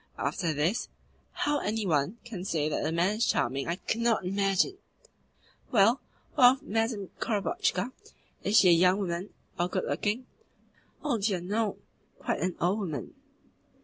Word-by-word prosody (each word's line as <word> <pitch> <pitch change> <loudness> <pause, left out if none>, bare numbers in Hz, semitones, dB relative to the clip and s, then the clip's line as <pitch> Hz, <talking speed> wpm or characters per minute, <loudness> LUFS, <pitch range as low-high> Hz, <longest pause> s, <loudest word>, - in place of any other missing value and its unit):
After 170 -4 -1
this, 160 +11 0 0.4
how 290 0 0
any 215 -2 -1
one 160 +5 +1
can 210 -7 -6
say 155 -5 0
that 155 - -1
the 155 - -1
man 180 +6 +1
is 235 - +2
charming 135 +1 0
I 170 - 0
cannot 230 +1 0
imagine." 195 - +1 0.9
"Well, 225 +3 +4 0.3
what 250 -3 +7
of 265 - -10
Madame 225 -3 -1
Korobotchka? 255 - 0 0.5
Is 210 +2 +3
she 185 - +7
a - - +8
young 180 +3 +5
woman 185 0 -3 0.3
or 175 +1 +1
good - - -1
looking?" 220 +5 -1 0.8
"Oh 280 -7 0
dear 200 -2 +1
no! 205 +4 -1 0.4
Quite - - -2
an 180 -1 -1
old 185 +5 +1
woman." 165 -8 -4
200 Hz, 150 wpm, -29 LUFS, 175-230 Hz, 0.9 s, a